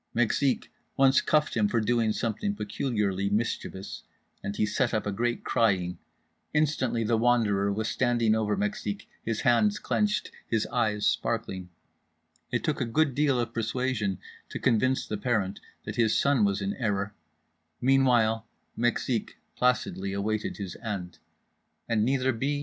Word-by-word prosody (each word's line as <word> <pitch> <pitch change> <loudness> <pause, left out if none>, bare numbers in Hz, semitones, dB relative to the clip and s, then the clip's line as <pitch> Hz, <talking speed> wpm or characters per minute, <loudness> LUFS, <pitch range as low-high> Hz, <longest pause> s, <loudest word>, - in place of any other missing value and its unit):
Mexique 120 +3 +1 0.3
once 135 0 +5
cuffed 155 0 +1
him 105 -2 +3
for 115 - +1
doing 115 0 +2
something 115 - -2
peculiarly 105 - -1
mischievous, 100 -2 -3 0.4
and 100 +1 -4
he 105 - +2
set 120 +3 0
up 110 - -1
a 105 - -1
great 120 +4 -1
crying—instantly 115 - -1
The 110 +1 +1
Wanderer 110 -5 +2
was 110 +2 -1
standing 120 -2 +2
over 110 -1 +1
Mexique, 205 0 -3 0.2
his 115 -1 -2
hands 205 - +3
clenched, 210 0 0 0.2
his 110 -2 +1
eyes 105 -2 +1
sparkling—it 90 -2 -4
took - - -1
a - - +1
good 145 +4 +2
deal 140 -1 +2
of 120 -1 -2
persuasion 115 -4 -1 0.3
to - - -5
convince 130 +2 +2
the 105 - -3
parent 105 -3 -1 0.3
that - - -5
his 115 -2 +3
son 140 -5 +3
was 100 0 0
in 100 +1 -1
error, 100 -4 -1 0.7
meanwhile 120 -4 +3 0.3
Mexique 120 0 -1 0.2
placidly 110 -6 0
awaited 105 +2 -2
his 95 -4 -5
end… 100 -6 -5 0.7
and 115 -2 +2
neither 130 +1 +2
B. 140 +5 -1
115 Hz, 140 wpm, -28 LUFS, 105-130 Hz, 0.7 s, once